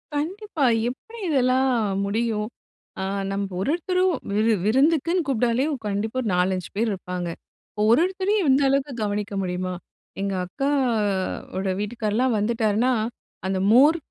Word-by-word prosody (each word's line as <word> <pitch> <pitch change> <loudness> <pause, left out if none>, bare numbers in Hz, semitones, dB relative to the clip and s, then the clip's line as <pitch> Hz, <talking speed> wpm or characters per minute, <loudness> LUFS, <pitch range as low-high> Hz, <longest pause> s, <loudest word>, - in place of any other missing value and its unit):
கண்டிப்பா! 335 +1 -2 0.2
எப்படி 450 - -10
இதெல்லாம் 260 -2 +3 0.3
முடியும்? 215 +1 -1 0.5
ஆ - - -1 0.3
நம்ப 195 0 -2
ஒருவொருத்தரும் 365 - +1 0.2
விரு 220 +2 +3
விருந்துக்குன்னு 315 - +2
கூப்பிட்டாலே 245 0 +1 0.2
கண்டிப்பா 210 +4 -2
ஒரு 235 - -3
நாலஞ்சு 180 -1 0
பேர் 225 +2 +1
இருப்பாங்க. 180 -2 -4 0.4
இப்போ 210 - -5
ஒரு 235 - +6
ஒருத்தரையும் 380 0 0
இந்த 270 +2 +4
அளவுக்கு 275 +1 0
கவனிக்க 205 0 -2
முடியுமா? 185 0 -2 0.5
எங்க 195 0 -1
அக்கா 275 +10 -2 0.9
ஓட 190 0 -1
வீட்டுக்கார்லாம் 225 +3 0
வந்துட்டாருன்னா, 220 +2 +1 0.6
அந்த 190 0 0
மோர் 285 +8 +6
235 Hz, 125 wpm, -24 LUFS, 205-290 Hz, 0.9 s, ஒரு